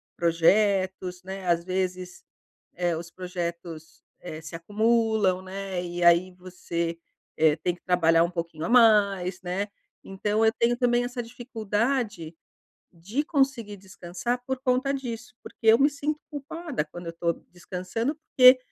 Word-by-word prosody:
projetos, 185 +1 +2
né. 190 0 -7
Às 170 -1 +2
vezes, 185 0 -3 0.5
eh, 175 -1 0
os 170 +1 -7
projetos, 170 -3 -6 0.2
eh, 155 -3 -7
se 160 0 -8
acumulam, 215 0 +1
né. 190 -1 -5
E 175 0 -5
aí 175 +2 +5
você, 175 -2 -4 0.4
eh, 155 -1 +4
tem 175 +2 -1
que 175 - -21
trabalhar 165 -2 +3
um 170 - -1
pouquinho 170 -2 -5
a - - -2
mais, 200 -6 +4
né. 185 +3 -2 0.3
Então 210 +3 -1
eu 220 - +4
tenho 240 +1 +2
também 245 -1 +2
essa 245 0 -4
dificuldade 230 - -2 0.6
de 200 - -3
conseguir 270 -9 0
descansar 190 +5 -5
por 265 0 -2
conta 260 +1 +1
disso, 245 -3 -6
porque - - -14
eu 220 +1 +8
me 280 +3 +4
sinto 290 +1 -3
culpada 290 - -4
quando 175 +3 -10
eu - - -3
estou 170 0 -1 0.2
descansando, 185 - -3
porque 255 -4 +6
190 Hz, 145 wpm, -26 LUFS, 175-235 Hz, 0.6 s, eu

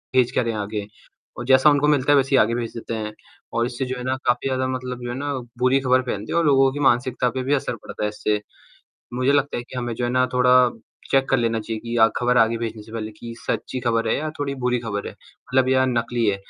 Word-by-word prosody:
भेज 125 -2 +4
क्या - - +1
रहे 115 -1 -2
हैं 110 - -4
आगे? 105 0 -4 0.5
और 120 - -5
जैसा 130 +2 +6
उनको 145 0 +3
मिलता 145 -1 +3
है 145 - +6
वैसे 135 -1 +2
ही - - +6
आगे 115 +2 +1
भेज 115 -2 -4
देते 115 0 -5
हैं 105 -1 -4 0.4
और 115 0 +1
इससे 125 +1 -3
जो 130 0 -4
है 125 - -6
ना 130 +1 0
काफ़ी 125 +2 +1
ज़्यादा 130 0 0
मतलब 125 -1 -4
जो 120 - -4
है 120 - -3
ना, 145 0 -2 0.3
बुरी 130 +2 +3
खबर 130 0 +3
फैलती 105 -4 -4
है - - +1
और 170 - +2
लोगों 135 -2 +4
की 145 - -5
मानसिकता 125 -1 +2
पे 130 +1 -3
भी 140 +3 0
असर 130 -3 -1
पड़ता 105 - -7
है 105 - +1
इससे। 105 0 -1 0.7
मुझे 130 +2 +2
लगता 145 0 +1
है 120 - -3
कि 130 - -11
हमें 120 -1 -3
जो 120 - -3
है 120 - 0
ना 130 0 +2
थोड़ा 125 0 +4 0.6
चेक 135 0 +3
कर - - +4
लेना 115 -1 0
चाहिए 110 0 -5
कि 115 +1 -4
या 110 - +7
खबर 125 0 +2
आगे 115 +1 +3
भेजने 115 -2 -5
से 110 - -15
पहले 110 -1 -4
कि 115 +2 -9
सच्ची 130 - -2
खबर 115 -1 0
है - - +2
या 155 +1 -3
थोड़ी 140 -1 -2
बुरी 125 0 +2
खबर 100 -3 -4
है - - -8
मतलब 130 0 -2
या 130 0 +3
नकली 120 -1 0
है। 100 -1 +2
125 Hz, 270 wpm, -22 LUFS, 115-130 Hz, 0.7 s, या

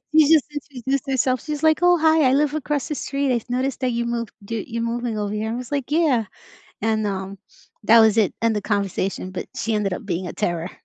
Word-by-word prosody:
She 310 -2 +6
just 315 -4 +5
introduced 275 -1 -3
herself, 255 -1 +1
she's 300 -1 -4
like, 315 0 +4
"Oh, 355 0 +5
hi, 315 -3 +4
I - - +2
live 290 +1 +2
across 295 -2 -2
the 305 - -3
street, 275 -2 -1
I've 240 0 -3
noticed 260 +2 -1
that 255 -1 0
you 235 0 -1
move 235 -1 -2 0.2
d 225 0 -3
you're 230 0 -3
moving 235 -1 -2
over 205 0 -2
here." 215 +1 -2
I - - -2
was 250 +2 -7
like, 280 -2 -2
"Yeah," 295 -8 +2 0.6
and, 220 -1 +1
um, 195 0 -4 0.5
that 230 +2 +7
was 220 -1 +5
it, 210 -4 +2
end 230 -1 +2
of 210 - -2
conversation, 195 -2 -2
but 185 - -5
she 225 -1 -1
ended 205 -2 0
up 180 - -5
being 180 -2 -3
a - - -5
terror. 175 -3 -2
235 Hz, 230 wpm, -22 LUFS, 210-280 Hz, 0.6 s, that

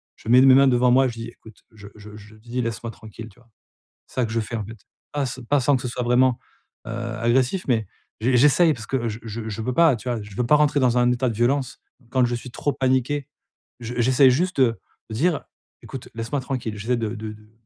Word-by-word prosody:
je - - -10
mets 125 +2 +7
mes 130 -1 +7
mains 135 +1 +6
devant 125 -1 +3
moi, 130 +1 +4
je 120 - -4
dis: 115 0 -7
«Écoute», 110 -2 -17
je 100 -1 -12
je 105 0 -12
je 110 +1 -14
dis: 120 +3 -6
«Laisse-moi 115 0 -4
tranquille» 110 0 -11
tu 100 - -23
vois? 125 - -24 0.6
C'est - - -19
ça 125 -2 +1
que 110 - -7
je 115 - 0
fais, 115 +1 -5
en 110 - -4
fait. 110 +2 -10 0.3
Pas 145 -1 -1
s 130 0 -5
pas 145 -1 +3
sans 140 +2 +3
que 130 - -5
ce - - -4
soit 125 +1 -4
vraiment, 125 +1 +3 0.5
heu, - - -6
agressif, 120 +7 -1
mais 110 -5 +1 0.3
j 125 +2 +2
j'essaye 150 +4 +5
parce 110 -2 -10
que 120 -4 -1
je 110 - -5
je 110 0 -6
je 110 +1 -5
veux 125 - -2
pas, 165 -5 +5
tu 125 - -8
vois? 115 -2 -2
Je 105 -1 -12
veux 125 - 0
pas 150 - +5
rentrer 150 -1 +2
dans 125 -2 +2
un 125 0 +3
état 125 +1 0
de 115 - -3
violence. 130 +2 0 0.3
Quand 130 -2 +2
je 120 - -2
suis 125 +2 -9
trop 145 +4 -2
paniqué, 130 +2 0 0.5
je 120 +1 -6
j'essaie 130 +3 +5
juste, 175 +6 0
heu, 115 -3 +3 0.3
de - - -5
dire: 165 +4 0 0.4
«Écoute, 135 -3 -9
laisse-moi 115 +5 -3
tranquille». 125 -5 -4
J'essaie 120 +5 -1
de 110 -2 -2
de 110 -1 -6
de 105 0 -19
120 Hz, 250 wpm, -23 LUFS, 115-130 Hz, 0.6 s, mets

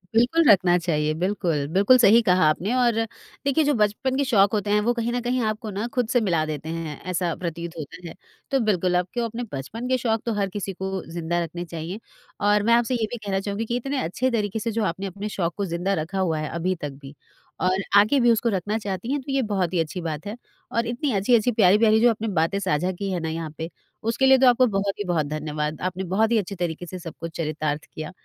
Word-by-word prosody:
बिल्कुल 250 +9 +4
रखना 180 -3 +5
चाहिए, 155 -3 0
बिल्कुल। 180 -6 0
बिल्कुल, 200 +7 +6
सही 230 -1 +6
कहा 185 -5 +3
आपने 185 +9 -1
और 245 -2 +3 0.5
देखिए 280 +3 +3
जो 290 0 +2
बचपन 215 +6 +1
के 280 - +2
शौक़ 205 -6 +4
होते 205 -1 -1
हैं 210 - +4
वो 235 +3 +1
कहीं 235 0 -2
न 245 - 0
कहीं 245 +1 0
आपको 215 +1 -3
ना 205 +4 -3
खुद 250 -3 +1
से 245 - +3
मिला 170 -7 +1
देते 155 0 -5
हैं, 165 -3 -5
ऐसा 180 -1 -1
प्रतीत 170 -1 -5
होता 165 +4 -8
है। 165 - -8 0.4
तो 270 - +3
बिल्कुल 180 -2 +1
आपको 180 +7 -1
अपने 230 +2 -4
बचपन 210 - -5
के 255 0 +2
शौक़ 225 -3 0
तो 230 - 0
हर 200 -2 -1
किसी 195 0 -4
को 190 0 -4
ज़िंदा 170 0 -1
रखने 170 +2 -6
चाहिए। 170 +4 -6 0.4
और 205 0 +3
मैं 230 +2 +4
आपसे 240 +2 +2
ये 230 -2 0
भी 240 - -3
कहना 200 -3 -2
चाहूँगी 200 +3 -3
कि 235 - -2
इतने 275 +3 -2
अच्छे 255 +10 -1
तरीके 215 -2 -1
से 230 +2 -2
जो 225 0 -1
आपने 190 +2 -3
अपने 200 +3 -5
शौक 175 -4 -2
को 200 - -1
ज़िंदा 175 +2 -1
रखा 190 +5 -4
हुआ 165 -4 0
है 155 - -3
अभी 175 +3 -1
तक 145 - -3
भी 140 +1 -11 0.5
और 185 +1 +1
आगे 215 +8 +5
भी 240 -1 +5
उसको 230 +1 +2
रखना 205 +1 -1
चाहती 205 +2 -4
हैं, 285 0 0
तो 275 - -6
ये 270 0 +2
बहुत 185 -4 0
ही 175 - +1
अच्छी 165 +3 -2
बात 160 0 -4
है। 205 - -4 0.4
और 230 0 0
इतनी 250 +4 -1
अच्छी-अच्छी, 225 +4 +3
प्यारी-प्यारी 215 +1 +5
जो 240 - +6
अपने 225 0 -2
बातें 165 +5 +1
साझा 180 -1 0
की 195 +2 -4
हैं 180 - -1
ना 160 - -2
यहाँ 160 -1 -4
पे, 160 +1 -4 0.3
उसके 230 +4 +1
लिए 265 0 +7
तो 260 0 +5
आपको 250 +1 +5
बहुत 200 -2 -1
ही - - -1
बहुत 175 -5 0
धन्यवाद। 150 0 -3
आपने 185 +1 -2
बहुत 220 +2 +3
ही 235 - +4
अच्छे 200 -1 -2
तरीके 175 -1 -3
से 185 +1 -7
सबको 165 -1 -7
चरितार्थ 155 -2 -3
किया, 155 +1 -6
195 Hz, 240 wpm, -24 LUFS, 170-230 Hz, 0.5 s, लिए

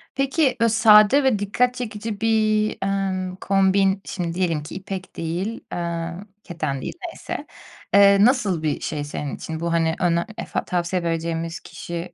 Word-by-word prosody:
Peki 275 -1 +1
bö 230 - +5
sade 220 +4 +6
ve 255 -6 +2
dikkat 240 +5 +1
çekici 215 -3 -5
bir, 215 -1 +2
emm, 190 -2 -1
kombin 195 0 +2
şimdi 170 -3 -3
diyelim 170 -4 -1
ki 155 - -9
ipek 190 0 -7
değil, 175 +7 -3
eee, 170 -1 -3 0.3
keten 155 -6 -3
değil - - -5
neyse, 335 - -7 0.5
eee, 200 0 +7
nasıl 210 - +2
bir 155 -2 0
şey 150 -2 -3
senin 145 -1 -5
için? 160 -1 -6
Bu 170 0 -1
hani 165 -1 +1
öne 170 -1 +2
efa - - -3
tavsiye 175 0 -1
vereceğimiz 165 0 -2
kişi 170 +1 -7
190 Hz, 155 wpm, -23 LUFS, 170-215 Hz, 0.5 s, eee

